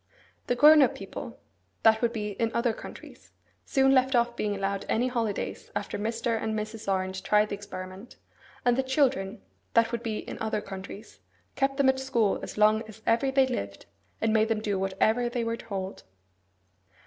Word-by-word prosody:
The 245 Hz, -, +1 dB
grown 300 Hz, +4 st, +8 dB
up 270 Hz, -, +3 dB
people -, -, -8 dB, 0.4 s
(that 220 Hz, -1 st, +5 dB
would 235 Hz, -1 st, +2 dB
be 210 Hz, -3 st, -3 dB
in 225 Hz, +3 st, -1 dB
other 235 Hz, -1 st, +2 dB
countries) -, -, -12 dB, 0.3 s
soon 270 Hz, 0 st, +3 dB
left 260 Hz, 0 st, +3 dB
off 240 Hz, 0 st, +2 dB
being 210 Hz, -3 st, -1 dB
allowed 195 Hz, 0 st, -2 dB
any 245 Hz, +3 st, +1 dB
holidays 230 Hz, -5 st, -3 dB
after -, -, -3 dB
Mr. 225 Hz, +1 st, -1 dB
and 220 Hz, 0 st, -1 dB
Mrs. 215 Hz, -1 st, -4 dB
Orange 190 Hz, 0 st, -1 dB
tried 210 Hz, +2 st, +3 dB
the -, -, -4 dB
experiment; 195 Hz, +1 st, -8 dB, 0.5 s
and 245 Hz, -1 st, +4 dB
the 265 Hz, -, +2 dB
children 260 Hz, -7 st, 0 dB, 0.3 s
(that 230 Hz, 0 st, +4 dB
would 235 Hz, -1 st, -2 dB
be 225 Hz, -3 st, -3 dB
in -, -, -7 dB
other 220 Hz, -1 st, 0 dB
countries) 195 Hz, +1 st, -9 dB, 0.4 s
kept 275 Hz, 0 st, 0 dB
them 280 Hz, -2 st, +3 dB
at 265 Hz, 0 st, +1 dB
school 235 Hz, -6 st, +1 dB
as -, -, -7 dB
long 215 Hz, +1 st, +4 dB
as 220 Hz, 0 st, -13 dB
ever 230 Hz, +4 st, +2 dB
they 265 Hz, 0 st, +4 dB
lived, 100 Hz, -, -5 dB, 0.3 s
and 220 Hz, -1 st, +1 dB
made 220 Hz, 0 st, +3 dB
them 225 Hz, -1 st, 0 dB
do 205 Hz, -3 st, -1 dB
whatever 215 Hz, +5 st, +1 dB
they 240 Hz, -1 st, -2 dB
were 230 Hz, 0 st, -1 dB
told. 195 Hz, -4 st, -6 dB
225 Hz, 185 wpm, -28 LUFS, 205-245 Hz, 0.5 s, grown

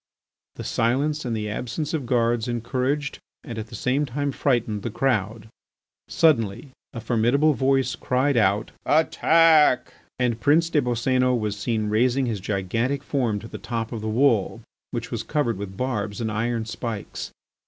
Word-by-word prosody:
This -, -, -6 dB
silence 140 Hz, +6 st, 0 dB
and 115 Hz, -2 st, -1 dB
the 105 Hz, 0 st, -3 dB
absence 125 Hz, -, -4 dB
of 145 Hz, -6 st, -2 dB
guards 120 Hz, -1 st, +1 dB
encouraged 130 Hz, +5 st, -2 dB, 0.2 s
and 115 Hz, -5 st, -6 dB
at 110 Hz, -, -6 dB
the -, -, -10 dB
same 140 Hz, +3 st, 0 dB
time 140 Hz, +3 st, -2 dB
frightened 120 Hz, -7 st, 0 dB
the 120 Hz, -, -3 dB
crowd. 110 Hz, -3 st, -1 dB, 0.6 s
Suddenly 130 Hz, -5 st, +1 dB, 0.2 s
a 115 Hz, -, -6 dB
formidable 120 Hz, +7 st, +2 dB
voice 135 Hz, 0 st, +1 dB
cried 130 Hz, +2 st, 0 dB
out: 105 Hz, -1 st, +2 dB
"Attack!" 160 Hz, -2 st, +4 dB, 0.2 s
And 120 Hz, -2 st, 0 dB
Prince 165 Hz, +3 st, +3 dB
des 150 Hz, -, +3 dB
Boscénos 125 Hz, +1 st, +1 dB
was 105 Hz, -1 st, -2 dB
seen 110 Hz, 0 st, -1 dB
raising 125 Hz, +5 st, +2 dB
his 115 Hz, -4 st, -2 dB
gigantic 115 Hz, +8 st, -1 dB
form 125 Hz, -8 st, 0 dB
to 115 Hz, -, -9 dB
the -, -, -8 dB
top 115 Hz, -2 st, -4 dB
of 115 Hz, -3 st, -5 dB
the 110 Hz, -, -3 dB
wall, 115 Hz, -3 st, +2 dB, 0.3 s
which -, -, -5 dB
was -, -, -2 dB
covered 145 Hz, -9 st, -1 dB
with 95 Hz, -1 st, -7 dB
barbs 110 Hz, -5 st, -2 dB
and 110 Hz, -2 st, -2 dB
iron 115 Hz, +1 st, -1 dB
spikes. 115 Hz, -1 st, -5 dB
120 Hz, 160 wpm, -24 LUFS, 110-135 Hz, 0.6 s, Attack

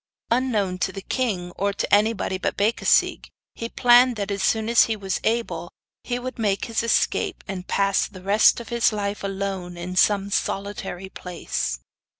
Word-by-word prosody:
Unknown 215 Hz, -7 st, +1 dB
to 190 Hz, -, 0 dB
the 195 Hz, 0 st, -8 dB
king, 200 Hz, -10 st, -2 dB
or 200 Hz, 0 st, 0 dB
to -, -, -3 dB
anybody 205 Hz, -2 st, +2 dB
but -, -, -2 dB
Becasigue, 215 Hz, +3 st, +2 dB, 0.3 s
he 230 Hz, -, -5 dB
planned 245 Hz, +1 st, +5 dB
that, 205 Hz, -1 st, -3 dB
as 200 Hz, -1 st, -2 dB
soon 220 Hz, +3 st, +1 dB
as 235 Hz, 0 st, +5 dB
he 225 Hz, -, -1 dB
was 195 Hz, -2 st, -3 dB
able, 230 Hz, +1 st, -1 dB, 0.3 s
he 245 Hz, -, -2 dB
would 255 Hz, 0 st, -6 dB
make 200 Hz, -3 st, 0 dB
his 230 Hz, -1 st, -1 dB
escape 370 Hz, -, 0 dB
and 190 Hz, -2 st, -6 dB
pass 195 Hz, -1 st, +1 dB
the 185 Hz, -3 st, -13 dB
rest 205 Hz, +5 st, +4 dB
of 235 Hz, -, -9 dB
his 235 Hz, -1 st, +2 dB
life 205 Hz, -1 st, -3 dB
alone 195 Hz, -3 st, -4 dB
in 180 Hz, +1 st, -6 dB
some 200 Hz, +1 st, +3 dB
solitary 195 Hz, -2 st, -3 dB
place. 170 Hz, -, -4 dB
200 Hz, 170 wpm, -23 LUFS, 190-230 Hz, 0.3 s, planned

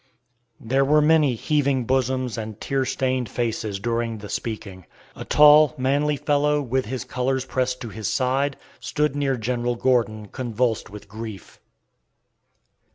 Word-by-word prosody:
There 135 Hz, +4 st, +1 dB
were 150 Hz, +2 st, +4 dB
many 150 Hz, -4 st, +4 dB
heaving 140 Hz, -1 st, 0 dB
bosoms 130 Hz, -1 st, 0 dB
and 110 Hz, -1 st, -6 dB
tear 135 Hz, -1 st, -1 dB
stained 130 Hz, -2 st, -1 dB
faces 110 Hz, -4 st, -2 dB
during 115 Hz, +1 st, -2 dB
the 105 Hz, -1 st, -9 dB
speaking. 100 Hz, -6 st, -5 dB, 0.3 s
A -, -, -7 dB
tall, 150 Hz, -1 st, +6 dB
manly 140 Hz, +3 st, +1 dB
fellow, 150 Hz, 0 st, +1 dB
with 130 Hz, -1 st, -1 dB
his 130 Hz, 0 st, -4 dB
colors 130 Hz, +1 st, -1 dB
pressed 130 Hz, -1 st, -1 dB
to 115 Hz, -, -5 dB
his 110 Hz, -1 st, -5 dB
side, 135 Hz, +2 st, 0 dB, 0.2 s
stood 150 Hz, -1 st, -1 dB
near 140 Hz, -2 st, 0 dB
General 120 Hz, +1 st, -1 dB
Gordon, 115 Hz, -4 st, 0 dB
convulsed 120 Hz, -2 st, -2 dB
with 105 Hz, +1 st, -11 dB
grief. 110 Hz, -2 st, -9 dB
125 Hz, 140 wpm, -23 LUFS, 115-135 Hz, 0.3 s, tall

